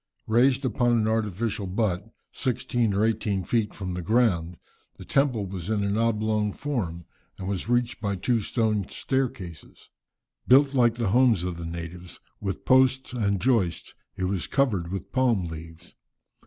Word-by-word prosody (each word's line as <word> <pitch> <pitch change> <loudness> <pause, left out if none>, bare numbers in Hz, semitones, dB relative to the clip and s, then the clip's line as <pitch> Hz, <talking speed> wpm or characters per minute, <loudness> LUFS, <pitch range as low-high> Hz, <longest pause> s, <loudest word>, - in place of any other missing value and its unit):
Raised 130 +4 +3
upon 120 0 +2
an 110 -2 +2
artificial 110 -1 -1
butt, 100 +1 -1 0.2
sixteen 120 -4 -1
or 105 +2 +3
eighteen 105 -3 0
feet 110 +2 0
from 95 -3 -5
the 90 - -3
ground, 90 -5 +1 0.4
the - - -10
temple 130 -7 +1
was 95 -1 -6
in 105 -2 +1
an 100 0 0
oblong 110 -2 +1
form, 95 - -3 0.3
and 95 - -6
was 100 +2 -3
reached 120 0 0
by 100 -2 -1
two 115 +5 0
stone 105 -3 0
staircases. 125 - -4 0.6
Built 135 +2 +6
like 120 -3 +3
the 115 -4 -1
homes 120 -4 +4
of 90 -2 -3
the 85 - -6
natives, 85 +1 -8 0.2
with 100 -2 -4
posts 130 0 +3
and 100 -5 0
joists, 110 -8 0 0.2
it - - -3
was 95 -1 -1
covered 105 -11 0
with 95 - -5
palm 120 -8 +2
leaves. 80 +1 -10
105 Hz, 155 wpm, -26 LUFS, 95-120 Hz, 0.6 s, Built